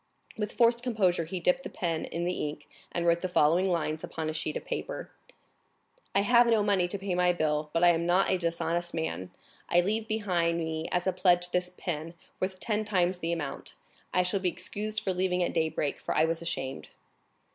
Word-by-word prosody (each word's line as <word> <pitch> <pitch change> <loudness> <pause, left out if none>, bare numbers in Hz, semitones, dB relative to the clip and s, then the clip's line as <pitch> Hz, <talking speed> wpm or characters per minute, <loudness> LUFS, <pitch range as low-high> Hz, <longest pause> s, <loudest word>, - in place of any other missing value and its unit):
With 210 -1 -3
forced 235 0 +4
composure 195 -9 +1
he 180 +3 -4
dipped 180 +8 +2
the - - -6
pen 165 -5 -2
in 170 +1 -3
the 180 -4 -1
ink, 150 0 -10 0.2
and 170 - -1
wrote 170 0 +3
the 185 - -1
following 175 +2 +3
lines 160 -3 -1
upon 160 -1 -3
a - - -6
sheet 155 -1 -2
of - - -9
paper: - - -4 1.0
"I 195 - +5
have 235 +3 +5
no 220 -2 +4
money 195 -3 +2
to 200 - -3
pay 195 -1 -3
my 180 0 +3
bill, 150 -2 0
but 165 +2 +1
I 175 - +8
am 170 0 +2
not 180 +2 +3
a 185 - +2
dishonest 170 0 -1
man; 95 - -3 0.4
I 175 - +5
leave 215 +4 -1
behind 180 -7 +1
me 160 -1 -2
as 180 0 0
a 190 - +1
pledge 180 -1 +3
this 180 0 +1
pin, 165 -2 -5 0.2
worth 185 0 -2
ten 215 +1 0
times 185 -3 +1
the 165 -1 -2
amount. 145 -5 -4 0.4
I 180 - +3
shall 185 +2 0
be 185 -1 +1
excused 210 +5 -3
for 190 - -1
leaving 180 0 +1
at - - -1
daybreak, 160 -3 0
for - - -3
I 155 - +5
was 165 0 -1
ashamed." 135 -6 -4
175 Hz, 210 wpm, -29 LUFS, 165-190 Hz, 1.0 s, I